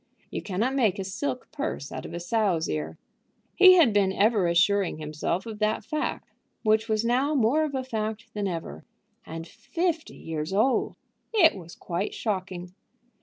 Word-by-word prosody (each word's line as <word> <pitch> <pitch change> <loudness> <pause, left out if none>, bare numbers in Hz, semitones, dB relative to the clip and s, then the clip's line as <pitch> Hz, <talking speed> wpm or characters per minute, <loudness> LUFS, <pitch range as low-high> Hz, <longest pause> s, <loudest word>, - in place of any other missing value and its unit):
You - - -3
cannot 215 +7 -1
make 230 -9 +2
a 195 - -3
silk 250 +7 -4
purse 285 - -4
out - - -6
of - - -10
a - - -3
sow's 185 -3 +1
ear. 80 +1 -3 0.6
He 370 0 +9
had 305 - +5
been 200 -2 +3
ever 205 -1 +3
assuring 185 +1 +2
himself 155 +4 -3
of 220 -2 -7
that 215 +1 0
fact, 305 -1 -3 0.4
which 220 0 +2
was 215 +1 +1
now 260 +6 +2
more 270 +5 +3
of 295 -3 -2
a 260 - -1
fact 220 -2 -4
than 205 -1 -2
ever. 165 - -5 0.4
And 165 +1 -6
fifty 335 - -3
years 160 +1 -4
old! 225 +7 +2 0.4
It 335 -7 +6
was 175 -3 -10
quite 180 +3 -3
shocking. 185 -4 -3
210 Hz, 170 wpm, -27 LUFS, 175-255 Hz, 0.6 s, He